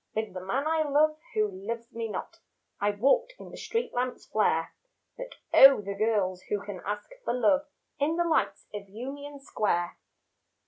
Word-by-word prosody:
With 220 -3 -2
the 185 - -5
man 255 +10 -1
I 320 0 +2
love 305 +1 +3 0.2
who 215 -1 +3
loves 230 +5 -6
me 230 0 -3
not - - -6 0.4
I 205 - +2
walked 280 - +2
in - - -11
the - - -9
street 460 +1 -3
lamps' 250 +1 -2
flare 165 -6 +1 0.4
But - - -8 0.2
oh, 270 0 +9
the 200 0 -4
girls 200 -3 0
who 205 - 0
can 200 -3 -6
ask 205 - -4
for 240 - -1
love 275 +5 +3 0.3
In 300 +3 +1
the 345 - +2
lights 330 -2 0
of 200 -1 -7
Union 280 +6 -7
Square. 190 -9 -1
230 Hz, 175 wpm, -28 LUFS, 205-290 Hz, 0.4 s, oh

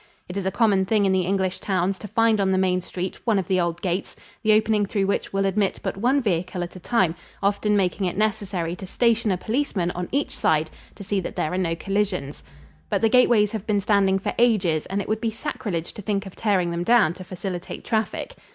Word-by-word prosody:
It 180 - -7
is 195 -1 -2
a - - +1
common 205 -4 +3
thing 210 -1 +3
in 195 - +3
the 185 -2 +1
English 190 -1 0
towns 190 0 0
to 210 - -7
find 225 0 +2
on 195 - +2
the 190 - +2
main 185 -1 +2
street 180 +1 -5
one 225 -4 +2
of 190 - -1
the 185 -1 +2
old 170 0 -2
gates, 185 0 -2 0.3
the 215 - +3
opening 215 0 +3
through 200 -1 0
which 200 - -1
will 195 0 0
admit 195 0 0
but - - -2
one 250 +7 +2
vehicle 180 -2 -1
at 175 - -8
a - - -8
time, 185 -3 +1 0.3
often 205 +1 +2
making 190 0 0
it 175 - -4
necessary 195 -5 -1
to 190 - -8
station 230 +1 +2
a 185 - +1
policeman 215 -5 -1
on 180 0 -5
each 285 +2 -1
side 155 0 +1 0.2
to - - -9
see 200 +1 -1
that 180 - -5
there 155 - -1
are - - 0
no 165 -3 0
collisions. 195 -6 -2 0.5
But - - 0
the 225 - +4
gateways 230 -4 +4
have 220 -2 -5
been 210 -2 +2
standing 195 -1 +3
for 195 - -3
ages 190 -10 +2
and 195 +2 -2
it - - -12
would 215 0 -1
be 230 - +1
sacrilege 215 - -4
to - - -8
think 200 -1 -1
of 195 - -10
tearing 190 -5 +1
them 170 0 -2
down 215 -5 +4
to 185 - -10
facilitate 180 0 -6
traffic. 220 - -2
195 Hz, 235 wpm, -24 LUFS, 180-215 Hz, 0.5 s, the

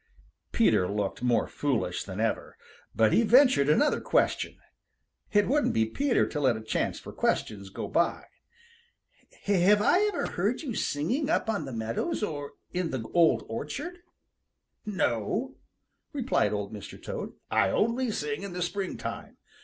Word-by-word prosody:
Peter 90 - +3
looked 100 0 -2
more 125 -1 +2
foolish 125 -11 -1
than 95 +1 -7
ever. 115 0 -2 0.4
But 110 -1 +4
he - - +5
ventured 240 - +5
another 290 - +3
question. - - +1 0.7
It 205 -1 +3
wouldn't 290 +3 +2
be 110 0 +3
Peter 255 - +1
to 150 - -4
let 130 -5 +2
a - - -7
chance 110 - -1
for - - -10
questions 100 -2 -1
go - - -5
by. - - 0 1.2
"Have 200 +1 +4
I 355 - +4
ever - - -2
heard 205 +8 -1
you 260 -6 -3
singing 225 - -1
up 320 -9 +1
on 200 -8 -2
the 135 - -6
meadows 115 - -2
or 145 -7 -4 0.2
in 180 -2 -1
the 125 -6 -4
Old 160 -10 +4
Orchard?" 280 - -5 0.9
"No," 200 - -1 0.6
replied 260 - +1
Old 105 0 -3
Mr. 105 -3 -9
Toad, - - -6 0.2
"I - - +3
only 235 +3 +1
sing 150 -7 -3
in 200 -2 -6
the 180 0 -2
springtime. 190 +2 -5
170 Hz, 150 wpm, -28 LUFS, -, 1.2 s, he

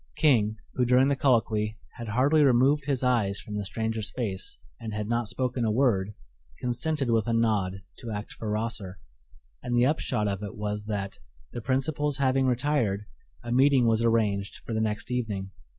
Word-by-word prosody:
King, 110 -8 +3 0.2
who 125 - +1
during 125 +2 +4
the 140 - +2
colloquy 110 -5 +1 0.2
had 120 -2 -6
hardly 135 +8 +3
removed 140 +2 +4
his 135 -3 -1
eyes 115 -6 +2
from 105 - -7
the 105 - -2
stranger's 110 +2 -2
face 100 - -4 0.2
and 110 -2 -6
had 105 0 -3
not 120 0 0
spoken 125 +1 -1
a 110 - +2
word, 105 -4 +1 0.4
consented 125 +2 0
with 115 -1 +2
a 115 - +1
nod 100 -5 +1 0.2
to 120 - -6
act 105 -1 -5
for 110 - -6
Rosser, 105 -3 -2 0.6
and 120 -1 -1
the 120 - +5
upshot 130 -7 0
of 100 0 -2
it 105 +2 -6
was 105 -1 -3
that, 100 -2 -4 0.3
the 120 - -4
principals 140 +3 0
having 135 -1 +2
retired, 125 -6 0 0.4
a 120 - -5
meeting 130 0 +4
was 115 0 +2
arranged 105 -4 +1
for 115 - -4
the 110 - 0
next 105 +2 -2
evening. 105 -6 -2
115 Hz, 180 wpm, -27 LUFS, 105-130 Hz, 0.6 s, the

